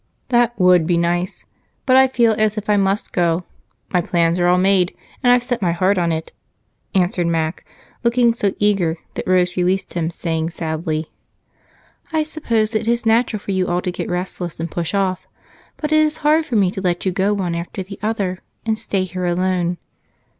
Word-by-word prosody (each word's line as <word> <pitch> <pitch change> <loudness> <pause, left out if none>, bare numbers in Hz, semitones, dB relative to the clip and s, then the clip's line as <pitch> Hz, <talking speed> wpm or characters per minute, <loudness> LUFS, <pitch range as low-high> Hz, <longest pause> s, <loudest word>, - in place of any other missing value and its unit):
"That 240 -1 +2
would 180 -3 +5
be 175 -1 +2
nice. 175 +3 -1 0.4
But 255 - +4
I 265 0 +7
feel 235 -3 +3
as 215 0 +1
if 210 0 -1
I - - +4
must 195 +1 0
go 170 0 +1 0.5
my 180 - +3
plans 170 0 +1
are 175 - +3
all 180 +1 +4
made, 185 -1 +2 0.3
and 245 -2 +4
I've 245 0 +4
set 245 -2 -2
my 175 -3 +1
heart 185 +3 +2
on 170 -1 +1
it," 160 0 -3 0.6
answered 180 -2 +1
Mac, 165 0 -1 0.4
looking 235 0 +3
so 205 -4 -1
eager 195 -6 +1 0.2
that - - -5
Rose 180 -1 +2
released 185 +2 0
him, 165 -2 -1
saying 165 -1 -2
sadly: 160 -1 -3 1.0
"I 315 -1 +1
suppose 235 -8 -1
it 220 0 -1
is 235 0 +1
natural 225 -1 +2
for 200 - -5
you 190 -1 0
all 175 +1 0
to 180 - -1
get - - -5
restless 180 -2 -4
and 165 0 -4
push 170 +3 -2
off, 185 -2 -1 0.5
but 300 -1 -3
it 310 - +5
is 310 0 +2
hard 310 +1 +4
for 240 - -2
me 195 -4 +3
to 190 - -5
let 180 -1 -1
you 190 - +2
go 190 +3 +1
one 180 -4 -2
after 170 +3 -4
the 195 +2 -10
other 200 -4 -1 0.3
and 220 -1 0
stay 195 -2 -1
here 185 0 -4
alone. 180 0 0
185 Hz, 195 wpm, -20 LUFS, 175-220 Hz, 1.0 s, I